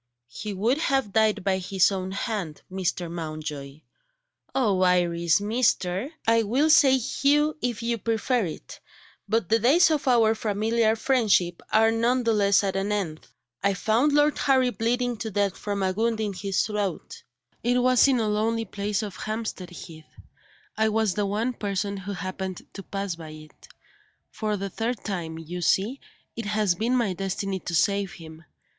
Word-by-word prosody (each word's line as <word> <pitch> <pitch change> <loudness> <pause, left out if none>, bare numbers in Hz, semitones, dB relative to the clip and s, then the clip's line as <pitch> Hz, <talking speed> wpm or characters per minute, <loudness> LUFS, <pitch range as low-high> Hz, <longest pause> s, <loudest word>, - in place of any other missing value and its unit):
"He 210 - -6
would 225 +9 0
have 270 - 0
died 220 -3 +2
by 190 -1 +1
his 190 +1 +2
own 190 -1 -3
hand, 195 -6 -4
Mr. 185 -2 -2
Mountjoy 155 -3 -6 0.3
" - - -42
"Oh, 210 -8 +2
Iris 175 -2 +3
'Mr.!'" 210 -1 0 0.2
"I 230 0 +4
will 260 +9 +2
say 270 -3 +6
'Hugh,' 290 +4 +1
if 240 -2 -2
you 235 0 -1
prefer 230 +1 0
it 155 - -8 0.5
but 220 -3 +1
the 225 - +4
days 315 +9 +5
of 300 -2 -1
our 230 -3 +4
familiar 220 +1 +1
friendship 215 -8 +1
are 225 +1 +4
none 240 +3 +1
the 230 -1 +2
less 200 -1 +3
at 195 -1 -1
an 195 +2 -1
end. 180 -7 -3 0.3
I 200 0 +1
found 225 +9 +2
Lord 295 0 +3
Harry 260 -3 +3
bleeding 245 +1 -1
to 220 +1 -4
death 200 -2 0
from 200 -1 -3
a 190 - +1
wound 225 +2 0
in 210 -2 -2
his 195 +1 -1
throat. 205 -4 -4 0.4
It 245 +1 +1
was 255 +1 +5
in 260 -3 +2
a 220 - 0
lonely 225 +2 0
place 205 +1 -2
on 210 - -4
Hampstead 215 -2 -5
Heath; 160 -3 -11 0.7
I 220 0 +2
was 220 -3 +1
the 205 +1 -1
one 220 +5 -1
person 200 -2 -2
who 195 +1 -6
happened 185 -1 -5
to 195 - -7
pass 195 -1 -4
by 160 -2 -9
it. 155 0 -14 0.6
For 215 -2 -2
the 195 0 -5
third 230 +3 -3
time, 170 -5 -4
you 170 +2 -6
see, 210 +10 +1 0.4
it 230 - -5
has 210 -3 +1
been 225 +8 0
my 225 -6 0
destiny 195 +1 -3
to 175 - -4
save 200 +3 +1
him. 160 -4 -12
210 Hz, 175 wpm, -25 LUFS, 185-230 Hz, 0.7 s, say